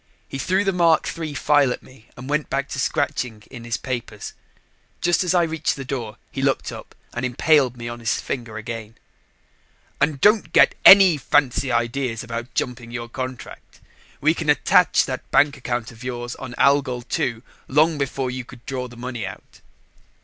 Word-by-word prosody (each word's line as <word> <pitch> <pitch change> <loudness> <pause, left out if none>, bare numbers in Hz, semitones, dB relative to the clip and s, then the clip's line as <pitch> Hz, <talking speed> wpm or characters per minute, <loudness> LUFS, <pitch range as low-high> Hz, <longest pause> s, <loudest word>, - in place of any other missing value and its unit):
He 135 - -6
threw 190 +6 +1
the 195 -1 0
Mark 170 -2 +3
III 160 -3 -5
file 145 -2 +3
at - - -5
me 130 -3 -18
and 125 +1 -9
went 150 +1 -1
back 140 +1 -1
to 130 - -4
scratching 115 -3 -2
in 120 -3 -9
his 115 -2 -2
papers. 120 -5 -5 0.7
Just 175 +1 +2
as 180 0 +1
I 175 - +4
reached 160 -1 -1
the 135 - -7
door, 120 -6 -5
he - - -4
looked - - 0
up - - -10 0.2
and 120 - -4
impaled 125 0 +2
me 120 0 -6
on 120 0 -6
his 115 -1 -1
finger 115 -4 -5
again. 115 0 -7 1.0
"And 150 -1 +1
don't 210 +5 +3
get - - +6
any 190 -5 +9
fancy 135 -1 +1
ideas 120 0 -1
about 120 0 -6
jumping 125 0 -3
your 120 0 -6
contract. 130 0 -8 0.4
We - - +3
can - - -4
attach - - +4
that - - -6
bank 145 0 +4
account 120 -3 -4
of 115 +1 -14
yours 120 -1 -5
on 130 -2 -8
Algol 140 -3 +2
II 115 -1 -2 0.2
long 155 +2 +3
before 135 -2 -2
you 130 0 -5
could 120 0 -15
draw 130 -2 -4
the 120 -1 -14
money 120 -4 -5
out." - - -12
130 Hz, 180 wpm, -22 LUFS, 120-145 Hz, 1.0 s, any